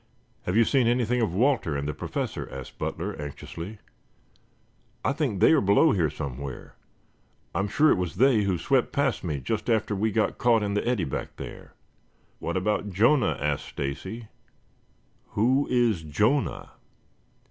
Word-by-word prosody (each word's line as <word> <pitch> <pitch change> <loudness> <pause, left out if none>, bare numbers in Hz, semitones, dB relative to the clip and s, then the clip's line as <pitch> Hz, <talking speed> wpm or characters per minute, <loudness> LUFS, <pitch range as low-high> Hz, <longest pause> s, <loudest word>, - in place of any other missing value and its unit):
"Have 90 +4 +1
you 115 - +7
seen 130 -2 +3
anything 120 0 +1
of 110 - +1
Walter 115 - +2
and 70 +1 -3
the 75 - -2
Professor?" - - -4
asked 65 -2 -9
Butler - - -3
anxiously. 85 +7 -7 1.3
"I 135 - +2
think 140 - -1
they - - +6
are 160 - +5
below 100 +11 +4
here 85 - +2
somewhere. 70 -3 -6 0.8
I - - -1
am 100 - 0
sure 150 +9 +4
it - - +2
was 90 -5 -3
they 125 +1 +4
who 95 -3 0
swept 130 +9 +1
past 140 -3 0
me 75 -6 -2
just 105 - -3
after 110 -2 +1
we 110 +3 0
got 110 0 0
caught 115 -3 +3
in 100 -1 -1
the 105 +3 -1
eddy 120 -7 +1
back 65 - -5
there." - - -9 0.7
"How - - -3
about 105 +2 0
Jonah?" 120 +9 +3
asked - - -1
Stacy. 95 +11 -5 1.1
"Who 130 +6 +3
is 120 -8 +2
Jonah?" 105 - 0
105 Hz, 160 wpm, -26 LUFS, 90-125 Hz, 1.3 s, you